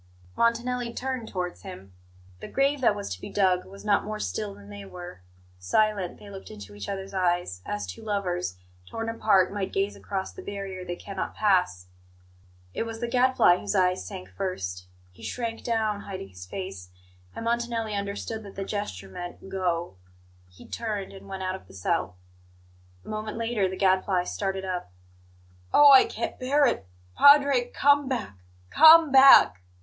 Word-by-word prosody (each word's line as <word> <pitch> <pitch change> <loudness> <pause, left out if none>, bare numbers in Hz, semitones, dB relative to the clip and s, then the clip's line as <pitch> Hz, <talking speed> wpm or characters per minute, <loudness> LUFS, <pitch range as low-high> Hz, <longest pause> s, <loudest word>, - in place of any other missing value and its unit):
Montanelli 235 +1 0
turned 255 -3 -3
towards 180 -2 -4
him. 180 - -11 0.5
The - - -8
grave 275 +1 +1
that 225 -4 +3
was 205 - -5
to 90 - -10
be - - -7
dug 185 -3 +1
was 195 +2 -13
not 205 -1 +3
more 215 0 -5
still 100 +2 -4
than 100 0 -14
they 100 0 -8
were. 175 - -10 0.4
Silent, 195 - 0
they 205 - -14
looked 195 -1 -10
into 105 -1 -11
each 100 -1 -7
other's 195 0 -5
eyes, 175 - 0
as 105 0 -3
two 90 -1 -9
lovers, 180 - -2 0.3
torn 225 0 -4
apart, 205 -4 +2
might 200 -2 -3
gaze 195 +1 -1
across 190 -2 -4
the - - -9
barrier 195 -2 -6
they 175 -1 -5
cannot 195 +1 -6
pass. 180 - +1 0.9
It - - -3
was 225 0 -5
the 240 - -2
Gadfly 250 -7 +4
whose - - -3
eyes 185 -1 +2
sank 190 -3 -8
first. 90 - -4 0.2
He 90 - -19
shrank 230 -2 -4
down, 220 -3 0
hiding 190 - -7
his 90 -1 -11
face; 95 - -7 0.5
and 230 - -6
Montanelli 235 -2 -1
understood 200 +2 -4
that 200 -2 -12
the 195 - -4
gesture 195 - -5
meant 175 - -9
"Go!" 175 - -2 0.5
He 90 - -16
turned, 210 -4 -4
and 195 0 -12
went 190 -1 -5
out 185 0 -1
of 190 - -9
the - - -15
cell. 90 -1 -2 0.9
A - - -17
moment 215 0 -5
later 225 -4 0
the 190 - -6
Gadfly 190 -1 +2
started 195 +1 -3
up. 180 - -4 0.8
"Oh, 290 -1 +8
I 265 - +8
can't - - -5
bear 280 +3 +3
it! 230 - 0 0.3
Padre, 285 -3 +6
come 285 0 +3
back! 215 - -4 0.3
Come 320 -1 +8
back!" 265 - +8
195 Hz, 170 wpm, -26 LUFS, 175-225 Hz, 0.9 s, Oh